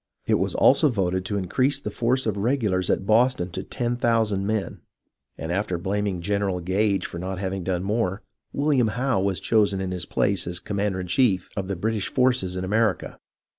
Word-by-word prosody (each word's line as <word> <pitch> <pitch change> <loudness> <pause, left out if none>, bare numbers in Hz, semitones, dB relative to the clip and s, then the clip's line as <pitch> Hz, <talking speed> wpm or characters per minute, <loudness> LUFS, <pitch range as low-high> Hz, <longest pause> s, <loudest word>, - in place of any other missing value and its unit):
It - - +2
was - - -1
also 145 +3 +5
voted 95 -5 -1
to 100 +1 -2
increase 130 +9 0
the - - -5
force 125 +3 0
of 110 -3 0
regulars 105 -5 0
at 95 - +1
Boston 110 -4 +2
to 95 - -4
ten 120 +5 -3
thousand 110 -5 +1
men, 110 -2 -2 0.6
and 80 +2 -4
after 95 -1 -1
blaming 95 0 -2
General 100 0 -1
Gage 95 +3 0
for 85 - -6
not 95 +1 -4
having 95 0 -3
done 90 0 -1
more, 100 -1 -1 0.3
William 140 -5 +2
Howe 125 -5 +1
was 95 -1 0
chosen 105 -3 +2
in 95 -1 -3
his 90 -2 -4
place 100 -3 0
as 85 0 -2
commander 100 0 -2
in - - -5
chief 95 -1 +1
of 95 -2 -3
the 100 - -2
British 105 +3 -1
forces 125 -8 +1
in 90 - -3
America. 105 +1 0
100 Hz, 190 wpm, -24 LUFS, 95-115 Hz, 0.6 s, also